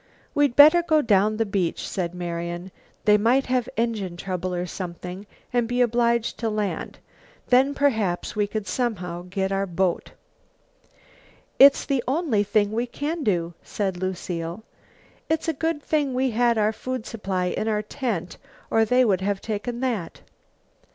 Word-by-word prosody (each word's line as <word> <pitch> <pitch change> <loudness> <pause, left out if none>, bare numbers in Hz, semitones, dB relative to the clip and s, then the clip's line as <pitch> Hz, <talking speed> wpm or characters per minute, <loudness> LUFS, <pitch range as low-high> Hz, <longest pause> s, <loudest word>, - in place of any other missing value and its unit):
"We'd 290 -4 +2
better 310 +4 +8
go 315 -3 +2
down 210 0 +3
the 225 - +1
beach," 195 -4 -1
said 180 -3 -3
Marian. 175 +1 -4 0.3
"They 210 0 +5
might 245 +6 +3
have 250 -2 0
engine 215 -6 -1
trouble, 185 -1 -3
or 175 0 -2
something, 180 +2 -7 0.3
and 240 -2 +2
be 245 +1 -1
obliged 235 -1 +1
to 230 - -1
land, 210 -2 -3 0.5
then 265 +3 +4
perhaps 220 -12 0
we 210 -1 +1
could 215 0 -4
somehow 180 -5 -3
get 190 0 -1
our 195 0 0
boat." 180 0 -1 1.5
"It's 275 +1 +7
the 270 -4 0
only 270 -6 +1
thing 205 0 +1
we 235 +3 -1
can 300 +6 -3
do," 175 -6 0
said 195 -3 -3
Lucile. 180 0 -4 0.7
"It's 320 +1 0
a 325 - +1
good 320 0 -2
thing 290 -4 0
we 260 0 +1
had 235 0 +2
our 215 0 +2
food 255 0 -5
supply 195 -5 -2
in 220 - -2
our 210 -1 0
tent, 210 -6 -4 0.3
or 225 0 +4
they 250 +3 +4
would 190 -4 +2
have 200 0 -1
taken 230 +4 -4
that." 230 -10 -3
215 Hz, 160 wpm, -24 LUFS, 185-250 Hz, 1.5 s, better